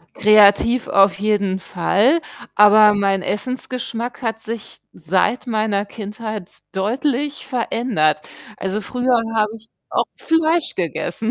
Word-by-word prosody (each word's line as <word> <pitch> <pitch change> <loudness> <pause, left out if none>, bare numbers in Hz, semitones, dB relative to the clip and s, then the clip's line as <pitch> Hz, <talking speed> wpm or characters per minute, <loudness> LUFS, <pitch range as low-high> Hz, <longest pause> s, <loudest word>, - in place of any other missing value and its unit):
Kreativ 215 +3 +4
auf 195 0 +4
jeden 200 -3 0
Fall, 210 - +1 0.4
aber 210 0 +7
mein 195 -2 0
Essensgeschmack 245 +2 -4
hat 225 -2 -2
sich, 225 0 -6
seit 185 +10 -1
meiner 215 -3 0
Kindheit, 210 -2 -7 0.2
deutlich 260 +7 -2
verändert. 230 - -1 0.3
Also, 195 +2 -3
früher 245 +2 0 0.2
habe 215 -1 +2
ich 225 - -18 0.2
auch - - 0
Fleisch 325 0 +1
gegessen. 175 - -2
215 Hz, 110 wpm, -19 LUFS, 200-245 Hz, 0.4 s, aber